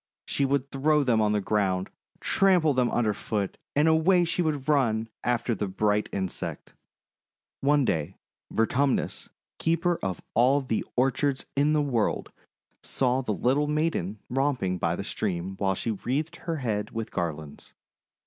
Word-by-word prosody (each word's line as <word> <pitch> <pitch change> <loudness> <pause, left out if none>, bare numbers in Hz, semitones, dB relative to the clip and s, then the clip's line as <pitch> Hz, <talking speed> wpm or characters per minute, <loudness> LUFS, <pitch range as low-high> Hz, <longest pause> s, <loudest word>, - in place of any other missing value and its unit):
She 140 - 0
would 140 0 0
throw 150 +2 +2
them 115 -4 +2
on 105 -1 +2
the 105 - +2
ground, 95 -3 0 0.3
trample 180 -6 +3
them 125 -2 +2
underfoot, 105 -2 -1 0.2
and 150 +2 +4
away 165 +3 +4
she 170 +1 0
would 150 -4 -1
run 115 -7 +2
after 120 -1 0
the 105 -1 -2
bright 105 +2 0
insect. 95 -2 -4 0.9
One 145 0 +3
day 80 -2 -1 0.4
Vertumnus, 130 +4 0 0.3
Keeper 170 +1 +1
of 95 -3 -2
All 130 +5 +4
the 120 -5 -1
Or 130 +2 +3
chards 140 -1 -1
in 145 +2 +3
the 150 -1 +3
World, 120 -6 -1 0.5
saw 130 0 0
the 125 - -3
little 130 +8 +1
maiden 150 - -1
romp 135 -1 0
ing 90 -1 -1
by 85 0 0
the 100 - -4
stream 95 -3 -3
while 95 -1 +1
she 115 - -2
wreathed 145 - -2
her 165 -1 -3
head 110 -8 -2
with 115 -1 -5
garlands. 80 -4 -5
125 Hz, 155 wpm, -27 LUFS, 105-145 Hz, 0.9 s, and